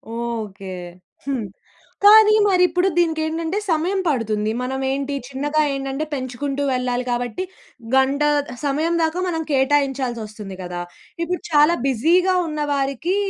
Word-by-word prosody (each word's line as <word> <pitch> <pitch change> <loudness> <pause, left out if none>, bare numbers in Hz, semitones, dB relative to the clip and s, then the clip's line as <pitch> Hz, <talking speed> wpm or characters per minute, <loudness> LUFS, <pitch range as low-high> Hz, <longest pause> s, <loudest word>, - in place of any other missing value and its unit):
Okay. 215 -5 -5 0.5
హ్మ్. 260 -6 -2 0.6
కానీ 430 +1 +8
మరి 365 -2 +4
ఇప్పుడు 360 +2 +1
దీనికేంటంటే, 325 +1 0
సమయం 345 +5 +1
పడుతుంది. 220 -6 0
మనమేంటి 265 +2 -2
చిన్నగా 290 +3 0
ఏంటంటే, 270 +2 -3
పెంచుకుంటూ 275 +1 -3
వెళ్ళాలి 250 0 -1
కాబట్టి, 245 +8 -2 0.5
గంటా 275 +2 +3 0.4
సమయం 305 +4 0
దాకా 320 +2 0
మనం 325 -2 -1
కేటాయించాల్సొస్తుంది 260 -7 0
గదా! 175 0 -5 0.4
ఇప్పుడు 350 +1 -2
చాలా 300 +3 +5
బిజీ‌గా 345 +9 +3
ఉన్న 305 -1 -4
వారికీ, 275 +6 -1
275 Hz, 115 wpm, -21 LUFS, 245-320 Hz, 0.6 s, కానీ